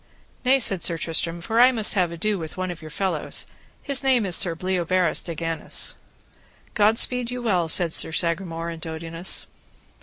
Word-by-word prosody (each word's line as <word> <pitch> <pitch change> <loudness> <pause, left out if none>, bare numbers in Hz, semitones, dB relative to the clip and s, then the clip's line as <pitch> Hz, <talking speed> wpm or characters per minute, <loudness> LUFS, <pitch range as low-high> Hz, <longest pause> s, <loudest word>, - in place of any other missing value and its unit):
Nay, 260 +1 +4
said 195 -8 +2
Sir 170 - +3
Tristram, 165 +1 -1
for 225 +6 -1
I 250 +2 +7
must 220 -4 0
have 180 -4 +1
ado 200 +4 -2
with 160 +1 -8
one 185 -1 -3
of 170 - -9
your 155 - -9
fellows, 190 +4 -2 0.4
his 280 -2 +1
name 260 -5 +2
is 180 -3 -1
Sir 175 -3 +2
Bleoberis 185 -1 0
de 170 - -6
Ganis. 165 +1 -3 0.8
God 215 +1 +3
speed 250 -1 +2
you 250 0 -5
well, 185 -7 +1
said 165 0 +2
Sir - - +4
Sagramore 170 0 -1
and 165 -1 -9
Dodinas. 165 +2 -2
180 Hz, 180 wpm, -23 LUFS, 165-215 Hz, 0.8 s, I